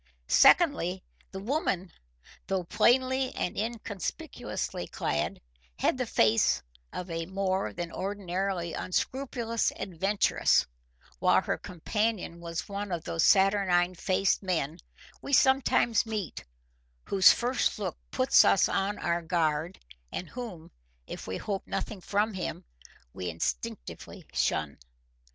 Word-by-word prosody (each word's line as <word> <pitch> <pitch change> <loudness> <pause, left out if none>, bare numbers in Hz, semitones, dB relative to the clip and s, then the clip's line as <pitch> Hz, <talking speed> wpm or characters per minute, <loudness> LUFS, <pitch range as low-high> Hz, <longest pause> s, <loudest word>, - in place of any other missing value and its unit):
Secondly, 190 - +4 0.3
the 190 - -7
woman, 195 - -1 0.6
though 190 -2 0
plainly 255 +7 +2
and - - -2
inconspicuously 210 -4 -4
clad, 75 - -2 0.4
had - - +2
the 255 - -1
face 110 - +3 0.3
of 180 -1 -6
a 165 0 -3
more 190 0 -1
than 170 -1 -5
ordinarily 190 -2 -3
unscrupulous 235 +2 -1
adventuress, 195 +3 +2 0.5
while - - +4
her - - 0
companion 200 0 -2
was 170 0 -5
one 200 0 -4
of 170 -2 -2
those 165 -1 -1
saturnine 190 -3 +4
faced 185 +2 +1
men 170 -4 -2 0.4
we 280 - -6
sometimes 260 -4 +4
meet, 210 - -4 0.6
whose 195 -1 +6
first 245 +2 0
look 195 -5 -3
puts 255 0 +5
us 195 - +4
on 200 +1 -1
our 170 0 0
guard 165 0 0 0.3
and 180 - -5
whom, 225 -10 -8 0.3
if - - -8
we 95 0 -3
hope 200 -2 -4
nothing 205 -4 -4
from 210 +4 0
him, 185 - -4 0.5
we 90 -1 -4
instinctively - - -5
shun. 75 -2 0
190 Hz, 120 wpm, -29 LUFS, 170-215 Hz, 0.6 s, whose